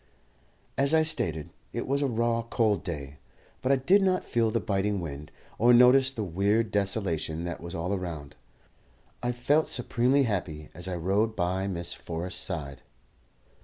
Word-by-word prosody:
As 140 Hz, +3 st, +3 dB
I 160 Hz, -, +5 dB
stated, 115 Hz, -, -1 dB, 0.2 s
it -, -, -3 dB
was 140 Hz, +2 st, 0 dB
a 140 Hz, -, +2 dB
raw, 115 Hz, -1 st, 0 dB
cold 115 Hz, -3 st, 0 dB
day; 75 Hz, -6 st, -6 dB, 0.4 s
but 130 Hz, -, +1 dB
I -, -, +6 dB
did 180 Hz, +10 st, +4 dB
not 185 Hz, -1 st, +2 dB
feel 115 Hz, -2 st, +1 dB
the 115 Hz, -, 0 dB
biting 100 Hz, -1 st, -1 dB
wind, 75 Hz, -3 st, -7 dB, 0.3 s
or 120 Hz, +2 st, +6 dB
notice 130 Hz, +2 st, +6 dB
the 115 Hz, -5 st, -4 dB
weird 100 Hz, +5 st, +1 dB
desolation 95 Hz, -6 st, 0 dB
that 85 Hz, -1 st, -5 dB
was 85 Hz, 0 st, -7 dB
all 85 Hz, +4 st, -2 dB
around. 85 Hz, -7 st, -5 dB, 0.9 s
I 120 Hz, -, 0 dB
felt 145 Hz, +6 st, +2 dB
supremely 125 Hz, +2 st, +2 dB
happy 80 Hz, -, -3 dB
as 90 Hz, +2 st, -9 dB
I 90 Hz, -, -3 dB
rode 100 Hz, +6 st, 0 dB
by 95 Hz, +1 st, -1 dB
Miss 85 Hz, -3 st, -2 dB
Forrest's 90 Hz, +2 st, -5 dB
side. 75 Hz, -7 st, -5 dB
100 Hz, 165 wpm, -28 LUFS, 85-120 Hz, 0.9 s, I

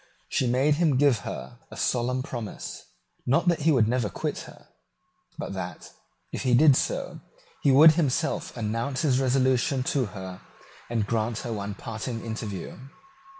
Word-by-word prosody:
She 130 Hz, -, +1 dB
made 135 Hz, +5 st, +2 dB
him 155 Hz, -6 st, +3 dB
give 140 Hz, -5 st, +4 dB
her 120 Hz, +3 st, -7 dB
a -, -, -10 dB
solemn 125 Hz, +1 st, 0 dB
promise, 120 Hz, -5 st, -6 dB, 0.4 s
not 140 Hz, +8 st, +2 dB
that 170 Hz, -2 st, +3 dB
he 155 Hz, +2 st, +3 dB
would 120 Hz, -7 st, +4 dB
never 120 Hz, -2 st, 0 dB
quit -, -, -3 dB
her, -, -, -16 dB, 0.7 s
but -, -, -5 dB
that, 90 Hz, -2 st, -6 dB, 0.4 s
if -, -, -4 dB
he 125 Hz, -2 st, +3 dB
did 145 Hz, +1 st, +6 dB
so, -, -, -2 dB, 0.4 s
he -, -, +3 dB
would 155 Hz, +4 st, +9 dB
himself 150 Hz, -6 st, -1 dB
announce 115 Hz, +5 st, -2 dB
his 135 Hz, -4 st, +3 dB
resolution 130 Hz, 0 st, +2 dB
to 135 Hz, -3 st, +1 dB
her, 95 Hz, -3 st, -8 dB, 0.5 s
and 115 Hz, -3 st, 0 dB
grant 110 Hz, +1 st, -1 dB
her 120 Hz, -, -2 dB
one 100 Hz, -1 st, -4 dB
parting 115 Hz, +2 st, -5 dB
interview. 110 Hz, -5 st, -5 dB
125 Hz, 155 wpm, -26 LUFS, 110-135 Hz, 0.7 s, would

